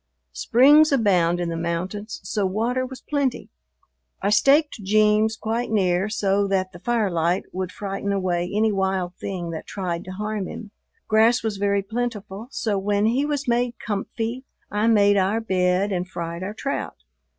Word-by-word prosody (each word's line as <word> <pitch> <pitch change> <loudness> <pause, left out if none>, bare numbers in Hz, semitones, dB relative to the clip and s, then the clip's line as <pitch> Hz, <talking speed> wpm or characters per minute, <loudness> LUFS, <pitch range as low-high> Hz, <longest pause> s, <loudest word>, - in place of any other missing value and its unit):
Springs 290 - +5
abound 180 -9 +3
in 175 -1 -2
the 165 - -3
mountains, 185 - -4
so 210 - -2
water 230 +7 0
was 260 0 -10
plenty. 280 -4 -1 0.7
I 200 - 0
staked 275 +3 +3
"Jeems" 215 +2 +3
quite 225 +3 -2
near 190 -2 +1
so 200 -1 +1
that 190 -1 0
the 175 - -12
firelight 185 -6 0
would 185 -1 -4
frighten 200 0 -4
away 180 -3 -1
any 215 +1 +2
wild 190 -2 -1
thing 175 -4 -5
that 160 - -7
tried 180 -4 -3
to 185 - -7
harm 210 -1 -3
him. 215 -2 -8 0.4
Grass 225 +2 +4
was 220 -3 -2
very 200 0 +1
plentiful, 220 -1 -4
so 215 -7 -1
when 205 +1 +1
he 255 +6 +1
was 285 -2 -2
made 240 0 +1
"comfy" 225 +4 -4 0.3
I 210 +2 +1
made 205 -2 +5
our 195 +3 +2
bed 185 -2 +1
and 180 -1 -2
fried 170 -1 -5
our 200 +3 -5
trout. 275 +5 -3
205 Hz, 160 wpm, -23 LUFS, 185-225 Hz, 0.7 s, Springs